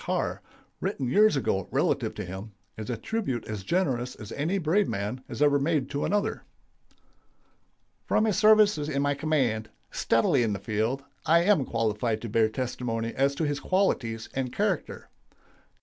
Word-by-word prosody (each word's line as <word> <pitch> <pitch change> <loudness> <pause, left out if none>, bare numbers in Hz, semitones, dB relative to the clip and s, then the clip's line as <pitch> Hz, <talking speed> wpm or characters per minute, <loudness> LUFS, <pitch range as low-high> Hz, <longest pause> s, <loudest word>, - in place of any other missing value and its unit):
Carr, - - -2 0.4
written 130 - -2
years 215 +4 +5
ago 95 -8 0
relative - - 0
to - - -5
him, 95 +4 -8 0.2
is 110 -1 -7
a 120 - -2
tribute 135 - -3
as 105 -2 -5
generous 130 - 0
as 110 -1 -10
any 165 +7 -1
brave 185 +4 +2
man 105 +6 -3
has 150 - -1
ever 145 -1 +4
made 140 -2 0
to 140 - -1
another: 205 0 -1 1.6
"From 215 - +3
his 215 -4 +1
services 210 -8 +5
in 140 -1 0
my 145 0 +2
command, 135 -8 0 0.2
steadily 115 +3 +2
in 110 -3 +1
the - - -2
field, 110 +7 -1 0.2
I 170 +2 +5
am 180 -8 +3
qualified 115 -1 -1
to 115 - -4
bear 110 +1 +3
testimony 115 -2 -3
as 140 +1 +1
to 160 - -2
his 145 -1 -1
qualities 125 - 0
and 130 -2 -2
character. 200 -1 -2
135 Hz, 165 wpm, -27 LUFS, 115-160 Hz, 1.6 s, years